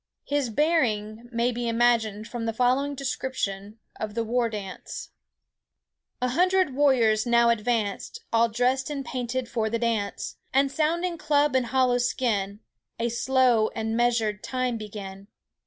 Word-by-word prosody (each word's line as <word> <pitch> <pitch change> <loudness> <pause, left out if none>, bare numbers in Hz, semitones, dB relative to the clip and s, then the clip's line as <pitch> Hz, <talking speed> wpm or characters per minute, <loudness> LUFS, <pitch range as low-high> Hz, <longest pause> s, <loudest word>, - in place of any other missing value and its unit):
His 285 -3 0
bearing 230 -6 0
may 235 +1 +1
be 240 0 -3
imagined 230 -2 +1
from 235 -2 -5
the 225 - -1
following 255 +4 +1
description 220 -7 -3 0.2
of 215 -1 -4
the 230 - 0
war 235 +1 0
dance:— 200 -4 -7 1.1
"A 250 - +2
hundred 365 +2 +2
warriors 245 -6 +3
now 235 0 +4
advance, 225 - -1
All 230 0 +4
dressed 250 +4 0
and 280 -2 -4
painted 245 0 -3
for 225 -2 -1
the 230 - 0
dance; 225 -4 -2 0.2
And 275 0 +3
sounding 335 +3 0
club 295 -2 +2
and 255 -2 +2
hollow 255 -1 +2
skin, 210 -5 -1 0.4
A 235 +1 0
slow 245 -2 +3
and 225 0 -2
measured 230 -3 +1
time 255 -2 -2
begin. 200 -2 -8
240 Hz, 140 wpm, -26 LUFS, 220-260 Hz, 1.1 s, now